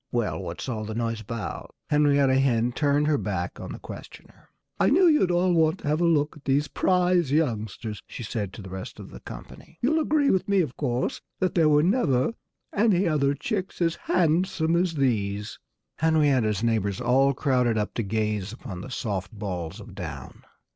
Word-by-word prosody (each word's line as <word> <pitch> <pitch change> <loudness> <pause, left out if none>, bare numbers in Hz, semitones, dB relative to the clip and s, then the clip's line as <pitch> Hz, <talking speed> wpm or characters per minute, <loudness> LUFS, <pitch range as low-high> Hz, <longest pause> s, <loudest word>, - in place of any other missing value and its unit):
"Well, 120 -3 -1
what's 85 +4 -6
all 110 -4 -3
the 110 0 -5
noise 115 -1 -2
about?" 110 +1 -6 0.2
Henrietta 140 -3 +4
Hen 120 -3 +2
turned 145 +2 +1
her 150 -2 +2
back 90 -4 -3
on - - -7
her - - -6
questioner. - - -12 0.3
"I - - +4
knew 360 +7 +5
you'd 300 - +4
all 175 +1 +2
want 160 +1 +3
to - - -6
have 155 +3 +1
a - - +3
look 155 -3 +2
at 145 - -18
these 145 +2 +2
prize 180 -5 +2
youngsters," 110 -7 -1
she 125 - -7
said 105 -3 -3
to 105 - -9
the 95 - -10
rest 95 0 -7
of - - -10
the - - -10
company. - - -11
"You'll 310 +6 +2
agree 300 -2 +2
with 190 +1 0
me, 200 -2 +4
of 140 -7 -3
course, 120 +1 -2 0.2
that 185 -2 +1
there 160 -3 +4
were 150 0 +4
never 165 - +2 0.4
any 200 -4 +3
other 145 -3 +2
chicks 190 - -3
as 165 -2 +2
handsome 170 -1 +1
as 175 -1 +1
these." 105 -6 -1 0.4
Henrietta's 140 -10 +2
neighbors 105 -4 0
all 130 +3 +3
crowded 125 -5 +1
up 105 0 -1
to - - -1
gaze 105 -1 -1
upon 95 -6 -8
the 115 - -8
soft 100 -7 -3
balls 90 -6 -5
of - - -11
down. - - -8
135 Hz, 190 wpm, -26 LUFS, 110-165 Hz, 0.4 s, knew